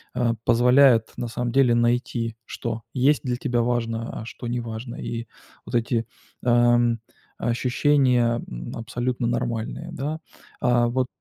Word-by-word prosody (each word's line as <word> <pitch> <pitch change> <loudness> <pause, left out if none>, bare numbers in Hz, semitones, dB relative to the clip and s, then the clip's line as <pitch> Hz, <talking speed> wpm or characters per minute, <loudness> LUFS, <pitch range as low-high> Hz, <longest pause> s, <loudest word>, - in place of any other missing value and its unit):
э, 120 -2 +2
позволяет 125 -1 +5
на 120 - -3
самом 120 +1 -3
деле 125 -2 +4
найти, 120 -1 0
что 115 -1 -5
есть 140 +3 +3
для 125 -2 -1
тебя 120 -2 0
важно, 115 -1 -2
а - - -8
что 120 +1 -8
не 120 0 -1
важно. 115 +1 -6
И 115 0 -5 0.4
вот - - -5
эти, 115 -1 +1 0.4
эм, 120 -1 +4 0.4
ощущения, 125 -1 +2
м, - - -7
абсолютно 120 +1 -2
нормальные, 120 -2 -2
да. 150 +4 -3 0.4
А, 120 -1 +3
вот 125 +1 0
120 Hz, 140 wpm, -24 LUFS, 115-125 Hz, 0.4 s, позволяет